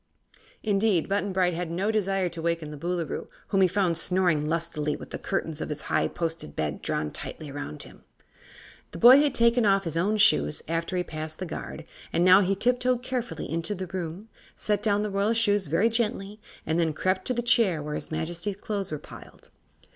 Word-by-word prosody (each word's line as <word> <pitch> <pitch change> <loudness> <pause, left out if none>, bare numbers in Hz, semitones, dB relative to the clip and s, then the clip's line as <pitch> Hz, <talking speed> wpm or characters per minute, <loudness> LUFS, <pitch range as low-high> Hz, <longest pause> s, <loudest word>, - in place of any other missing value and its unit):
Indeed, 205 -4 +2
Button 200 0 0
Bright 180 -1 +2
had 170 0 -3
no 190 +6 0
desire 195 -3 0
to 170 -1 -5
waken 165 -2 -2
the - - -7
Boolooroo, 170 +1 -3 0.2
whom 195 -2 +2
he 185 - +6
found 180 -2 +1
snoring 175 -5 +2
lustily 155 -2 -1
with - - -10
the - - -5
curtains 160 -1 -3
of - - -4
his 150 - -4
high - - 0
posted 165 - -3
bed 75 -2 -2
drawn 75 -1 -2
tightly 150 -3 -6
around 105 - -6
him. - - -15 0.9
The - - -6
boy 245 +8 +9
had 295 -2 +1
taken 235 +1 +4
off 195 -2 +3
his 165 -2 -3
own 205 +6 +1
shoes 75 - +3
after 165 +3 -2
he 180 - +1
passed 155 -1 -5
the 185 - -4
guard 160 -1 -7 0.3
and 175 - +2
now 185 +2 +8
he 195 0 +1
tiptoed 250 +3 +1
carefully 250 -2 -3
into 165 +5 -1
the 185 0 -4
room, 180 +2 -6 0.3
set 210 -1 -1
down 210 -1 +2
the 210 - -3
royal 200 +3 +1
shoes 205 -5 +2
very 165 +9 +3
gently 215 -3 -2 0.2
and 160 +2 0
then 160 -2 +1
crept 185 +4 0
to 255 - 0
the 240 - -1
chair 210 - +3
where 150 0 -4
his - - -4
Majesty's 170 +5 -2
clothes 200 -2 -4
were 155 - -2
piled. - - -14
185 Hz, 200 wpm, -27 LUFS, 165-205 Hz, 0.9 s, boy